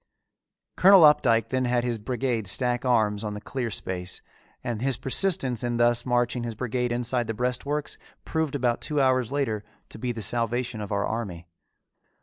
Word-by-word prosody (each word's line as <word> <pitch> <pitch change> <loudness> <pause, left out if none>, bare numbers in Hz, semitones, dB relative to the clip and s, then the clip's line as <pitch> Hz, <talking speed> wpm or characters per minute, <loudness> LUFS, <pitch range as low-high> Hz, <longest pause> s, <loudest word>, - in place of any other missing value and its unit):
Colonel 190 -1 +8
Opdycke 120 -7 +4
then 130 0 0
had 120 -1 +1
his 120 -2 -2
brigade 120 -1 -2
stack 125 +5 0
arms 110 -4 +2
on 105 -1 -4
the - - -5
clear 120 +3 -4
space, 95 -3 -4 0.4
and 115 -2 -3
his 135 -2 +1
persistence 135 - +1
in 120 -1 -1
thus 120 +1 +2
marching 120 0 +1
his 115 -1 -4
brigade 125 +1 -2
inside 120 0 0
the 115 - -3
breastworks 125 +5 -2 0.3
proved 160 -3 -1
about 120 -3 0
two 150 -2 -1
hours 130 -2 +2
later 130 -7 -1 0.3
to - - -10
be 125 +1 -2
the 115 -2 -5
salvation 120 +1 -1
of 105 - -6
our 100 0 0
army. 100 -7 -4
120 Hz, 170 wpm, -26 LUFS, 110-130 Hz, 0.4 s, Colonel